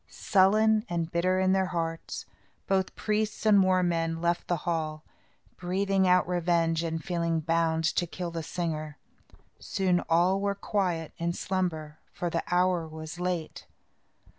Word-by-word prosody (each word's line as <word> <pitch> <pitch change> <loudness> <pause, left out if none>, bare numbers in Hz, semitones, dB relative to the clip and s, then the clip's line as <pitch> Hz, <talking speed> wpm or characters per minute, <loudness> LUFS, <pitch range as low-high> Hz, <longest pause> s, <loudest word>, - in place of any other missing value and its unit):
Sullen 215 +3 +3
and 170 -1 -2
bitter 185 +2 +1
in 190 0 +3
their 190 -1 +2
hearts, 165 -2 -4 0.4
both 190 -1 0
priests 215 0 -1
and 205 -2 +6
war 185 -1 +3
men 165 -1 0
left 170 +1 0
the 175 - +1
hall, 155 -2 -2 0.5
breathing 190 +1 +1
out 180 -1 +4
revenge 170 -2 +1
and 165 -1 -3
feeling 170 -2 0
bound 165 0 +1
to 175 - +1
kill 175 0 -5
the 165 0 -4
singer. 155 -2 -4 0.6
Soon 185 -3 0
all 180 +4 +3
were 200 0 0
quiet 180 -6 -2
in 170 +1 -1
slumber, 160 -5 -3
for 175 -1 -3
the 165 - 0
hour 180 -2 +2
was 160 +2 -8
late. 180 -3 -3
175 Hz, 145 wpm, -28 LUFS, 165-185 Hz, 0.6 s, and